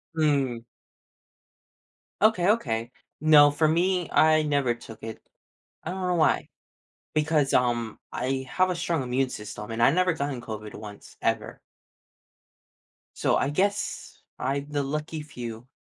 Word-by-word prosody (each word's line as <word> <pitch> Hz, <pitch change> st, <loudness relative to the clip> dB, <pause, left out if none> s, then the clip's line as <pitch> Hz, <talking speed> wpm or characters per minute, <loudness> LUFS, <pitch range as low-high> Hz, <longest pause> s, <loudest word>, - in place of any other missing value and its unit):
Mm. 135 Hz, -7 st, +1 dB, 1.6 s
Okay, 205 Hz, -4 st, +4 dB
okay. 120 Hz, -, 0 dB, 0.3 s
No, 150 Hz, -2 st, +7 dB
for 155 Hz, +2 st, +2 dB
me, 175 Hz, +2 st, +1 dB
I 155 Hz, 0 st, +5 dB
never 140 Hz, -5 st, +1 dB
took 115 Hz, -2 st, -12 dB
it. 110 Hz, -1 st, -7 dB, 0.6 s
I 160 Hz, -, -3 dB
don't 185 Hz, 0 st, -3 dB
know 180 Hz, -, +1 dB
why. 160 Hz, -3 st, +2 dB, 0.7 s
Because, 150 Hz, -2 st, +2 dB
um, 120 Hz, -2 st, +1 dB
I 130 Hz, +1 st, -2 dB
have 185 Hz, 0 st, +2 dB
a -, -, 0 dB
strong 170 Hz, -4 st, -1 dB
immune 130 Hz, +1 st, 0 dB
system 105 Hz, 0 st, -7 dB
and 115 Hz, +1 st, -2 dB
I've 135 Hz, -, +5 dB
never 185 Hz, 0 st, +3 dB
gotten 140 Hz, -4 st, -3 dB
COVID 110 Hz, -2 st, -7 dB
once 105 Hz, -1 st, -10 dB
ever. -, -, -1 dB, 1.6 s
So -, -, +2 dB
I 140 Hz, -, +1 dB
guess 200 Hz, +7 st, -2 dB, 0.2 s
I'm 140 Hz, +2 st, -2 dB
the 145 Hz, -1 st, -1 dB
lucky 150 Hz, +2 st, -4 dB
few. 120 Hz, -4 st, -8 dB
145 Hz, 135 wpm, -26 LUFS, 120-160 Hz, 1.6 s, No